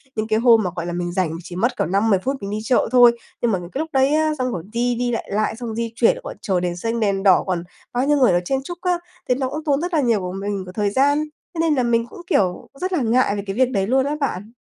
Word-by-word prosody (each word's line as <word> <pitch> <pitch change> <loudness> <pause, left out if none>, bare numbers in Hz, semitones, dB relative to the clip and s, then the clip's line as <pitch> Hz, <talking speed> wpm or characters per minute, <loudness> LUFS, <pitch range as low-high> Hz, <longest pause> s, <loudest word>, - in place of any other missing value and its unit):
những 215 0 -2
cái 220 0 +1
hôm 230 -2 +5
mà, 180 - -1
gọi 170 - -3
là, 175 - -4
mình 175 0 -2
rảnh 180 -3 0
mình 165 - -6
chỉ 175 - -9
mất 235 +7 0
cỡ - - +1
5-10 195 +3 +2
phút 265 +9 -1
mình 200 - -5
đi 210 - -2
chợ 240 +1 +2
thôi, 245 -2 +7 0.3
nhưng 235 - +2
mà 190 - 0
những 175 0 -10
cái 270 - -4
lúc 320 - -2
đấy 270 +2 +3
á, 310 0 +2
xong 255 -1 -1
rồi 170 - -4
đi 245 +1 +1
đi 245 +1 -1
lại 230 - -3
lại, 215 +2 0
xong 240 0 -6
rồi 220 - -5
đi 230 -1 -2
chuyển 245 - +4
rồi - - -10
còn - - -7
chờ 190 -3 0
đền 175 -1 -2
xanh, 230 +5 -2
đèn 200 -2 0
đỏ, 190 -3 +5
còn 180 -2 -1 0.3
bao 250 +2 +1
nhiêu 295 0 +3
người, 255 -8 +5
ờ, 175 - +3
chen 270 +7 0
chúc 350 +5 -7
á, 360 -1 +1 0.3
thế 250 - +4
nó 260 0 -2
cũng 305 +3 -5
tốn 290 -1 +1
rất 350 0 -3
là 310 - +3
nhiều 235 -5 +2
của 180 -1 -4
mình 195 0 -3
của 180 - -9
thời 205 +1 0
gian, 280 +7 +3 0.4
thế - - -4
nên 320 -2 +2
là 255 - +1
mình 230 -1 +1
cũng, 345 - -11
kiểu, 185 - +1
rất 370 0 -2
là 340 - +2
ngại 235 -2 +2
về 200 - -4
cái 195 - -3
việc 255 0 +3
đấy 195 -4 0
luôn 265 +2 +2
á 290 - -1
bạn. 215 -5 -3
230 Hz, 320 wpm, -21 LUFS, 195-265 Hz, 0.4 s, thôi